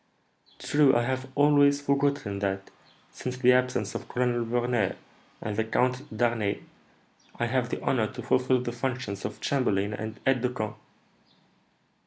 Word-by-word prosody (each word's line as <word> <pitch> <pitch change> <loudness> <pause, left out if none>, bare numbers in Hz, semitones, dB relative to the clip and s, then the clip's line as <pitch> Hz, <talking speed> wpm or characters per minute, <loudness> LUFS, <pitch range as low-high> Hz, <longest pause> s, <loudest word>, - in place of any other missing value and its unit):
"True. 145 -2 +3
I 120 - +3
have 130 +1 -2
always 145 -1 +5
forgotten 140 -7 0
that, 95 -1 -2 0.4
since 125 0 -5
the 125 0 +5
absence 125 0 +1
of - - -6
Colonel 120 -1 0
Verner 120 -3 0 0.5
and 105 -1 -3
the 110 - +1
Count 125 +3 +1
d'Harneim, 110 -2 -1 0.7
I 120 - -1
have 125 0 0
the - - -3
honour 115 -5 +2
to 125 -2 -7
fulfil 130 +1 +2
the 120 - -2
functions 120 -5 -3
of - - -5
chamberlain 105 -7 +1
and 110 +2 -5
aide 130 -2 +3
de 125 - +1
camp." 110 -4 -4
125 Hz, 150 wpm, -27 LUFS, 110-130 Hz, 0.7 s, always